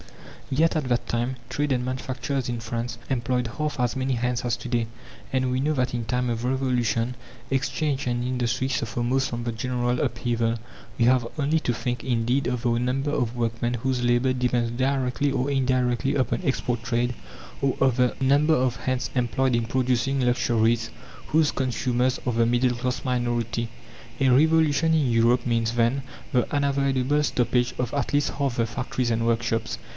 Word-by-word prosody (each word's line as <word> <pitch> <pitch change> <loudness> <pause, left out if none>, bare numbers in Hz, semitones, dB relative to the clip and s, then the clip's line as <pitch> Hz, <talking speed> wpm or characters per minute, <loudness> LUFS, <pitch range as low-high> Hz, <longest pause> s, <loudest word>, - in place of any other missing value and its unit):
Yet 160 +5 +2
at 155 -3 0
that 120 -1 0
time 120 +2 -1
trade 145 +2 -1
and 125 -1 +1
manufacturers 130 0 -3
in 120 -1 -2
France 115 +1 -4
employed 125 -1 0
half 150 -3 -2
as 125 0 +1
many 130 0 0
hands 125 0 -1
as 120 -1 0
to 120 - -8
day. 120 -2 0 0.4
And 130 -1 +1
we 130 +1 0
know 150 +3 +1
that 130 -3 0
in 120 -1 -2
time 125 +2 -1
of 115 0 -2
Revolution 125 -2 0 0.3
exchange 135 +1 -1
and 120 0 0
industry 125 0 -1
suffer 120 -2 -2
most 130 +3 +1
from 120 0 -4
the 120 - -2
general 125 +1 -1
upheaval. 115 -1 0 0.4
We 115 - +3
have 125 -1 +4
only 150 +2 +2
to 120 - 0
think, 120 +1 -3
indeed, 125 +2 +1
of 125 -1 -2
the 120 - +2
number 135 +4 0
of 125 -5 -1
workmen 120 0 -1
whose 125 +1 -1
labour 120 +2 +3
depends 125 -2 0
directly 130 +2 0
or 135 0 0
indirectly 130 -1 +1
upon 130 +2 0
export 125 -4 -1
trade, 120 +1 0 0.5
or 135 -2 +1
of 130 -3 +3
the 125 -1 +2
number 145 +4 +4
of 125 -3 +1
hands 130 +3 -2
employed 125 +1 +1
in 115 -1 0
producing 130 +1 +1
luxuries, 115 -2 +2 0.4
whose 155 -1 +3
consumers 125 0 0
are 125 - 0
the 115 0 +3
middle 120 +1 +2
class 125 +1 -3
minority. 120 -2 -1 0.5
A 135 - +3
revolution 160 +2 +4
in 140 -6 +2
Europe 120 +2 +3
means, 115 -1 +1
then, 120 +3 +2 0.3
the 125 -2 +1
unavoidable 140 0 +1
stoppage 125 -2 +1
of 125 +1 -2
at 140 - -1
least 145 0 +2
half 140 -4 -2
the 115 - +2
factories 125 +1 -2
and 115 0 0
workshops. 115 - 0
125 Hz, 175 wpm, -25 LUFS, 120-135 Hz, 0.5 s, have